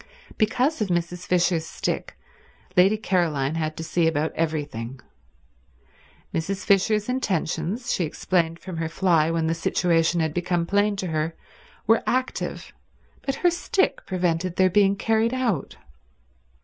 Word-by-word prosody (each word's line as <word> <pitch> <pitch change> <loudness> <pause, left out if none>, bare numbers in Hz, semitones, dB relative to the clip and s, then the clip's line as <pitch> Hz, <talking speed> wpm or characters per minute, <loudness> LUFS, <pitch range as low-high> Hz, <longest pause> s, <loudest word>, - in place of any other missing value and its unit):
Because 250 +7 +1
of 210 - +1
Mrs. 175 0 -2
Fisher's 175 -2 +2
stick - - -3 0.6
Lady 195 +4 +5
Caroline 165 -9 0
had 155 -1 -2
to 165 - -4
see 165 0 +1
about 160 0 0
everything. 145 -6 -3 1.3
Mrs. 190 +4 -2
Fisher's 205 +2 +3
intentions, 220 -2 -1
she 180 - 0
explained 165 +1 0
from 180 -1 -8
her 165 0 -2
fly 165 -3 +2
when 165 -1 0
the 160 - +1
situation 165 0 +1
had 160 -2 0
become 175 0 0
plain 205 +3 +2
to 190 -2 -3
her, 160 +1 -1 0.5
were 225 - +4
active, 255 +1 -2 0.5
but 275 - -1
her 350 - +6
stick 350 +3 0
prevented 180 -1 -1
their 185 -1 +3
being 200 0 +4
carried 225 +4 +1
out. 230 - -1
175 Hz, 135 wpm, -24 LUFS, 160-205 Hz, 1.3 s, her